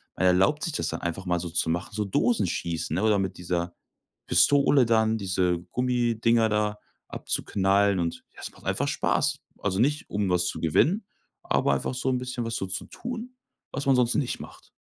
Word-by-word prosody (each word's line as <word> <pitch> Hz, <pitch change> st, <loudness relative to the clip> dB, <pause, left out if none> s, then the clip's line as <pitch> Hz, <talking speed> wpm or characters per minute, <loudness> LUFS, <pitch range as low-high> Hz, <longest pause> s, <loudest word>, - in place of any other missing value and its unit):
man 95 Hz, -, 0 dB
erlaubt 95 Hz, +11 st, +3 dB
sich 165 Hz, -, -1 dB
das -, -, -1 dB
dann -, -, -4 dB
einfach 85 Hz, +2 st, -4 dB
mal 90 Hz, -1 st, 0 dB
so 85 Hz, -, -5 dB
zu 80 Hz, 0 st, 0 dB
machen, 85 Hz, +2 st, -2 dB
so 105 Hz, 0 st, -1 dB
Dosenschießen, 90 Hz, -7 st, 0 dB
ne? 95 Hz, -, 0 dB
Oder 105 Hz, -2 st, +3 dB
mit 95 Hz, -2 st, -3 dB
dieser 85 Hz, -1 st, -2 dB, 0.5 s
Pistole 140 Hz, -2 st, +5 dB
dann 110 Hz, -1 st, +2 dB
diese 90 Hz, -3 st, 0 dB
Gummidinger 120 Hz, -2 st, +2 dB
da 105 Hz, 0 st, 0 dB, 0.3 s
abzuknallen 100 Hz, 0 st, +1 dB
und 85 Hz, -1 st, -3 dB
ja, -, -, -13 dB
es -, -, -5 dB
macht -, -, -19 dB
einfach -, -, 0 dB
Spaß. -, -, +1 dB, 0.2 s
Also 95 Hz, -1 st, 0 dB
nicht, 145 Hz, +6 st, +1 dB
um 100 Hz, -2 st, -1 dB
was 90 Hz, -1 st, +2 dB
zu -, -, -3 dB
gewinnen, 160 Hz, -, +2 dB, 0.4 s
aber 70 Hz, -, +1 dB
einfach 70 Hz, -, -2 dB
so 130 Hz, +1 st, -2 dB
'n 130 Hz, -, +1 dB
bisschen 125 Hz, -1 st, -4 dB
was 115 Hz, 0 st, -3 dB
so 95 Hz, -, -2 dB
zu 95 Hz, 0 st, -4 dB
tun, 245 Hz, +1 st, -7 dB, 0.4 s
was 140 Hz, +2 st, -4 dB
man 135 Hz, -1 st, +5 dB
sonst 125 Hz, -1 st, +2 dB
nicht 135 Hz, -, -1 dB
macht. -, -, -12 dB
105 Hz, 195 wpm, -26 LUFS, 90-125 Hz, 0.5 s, Pistole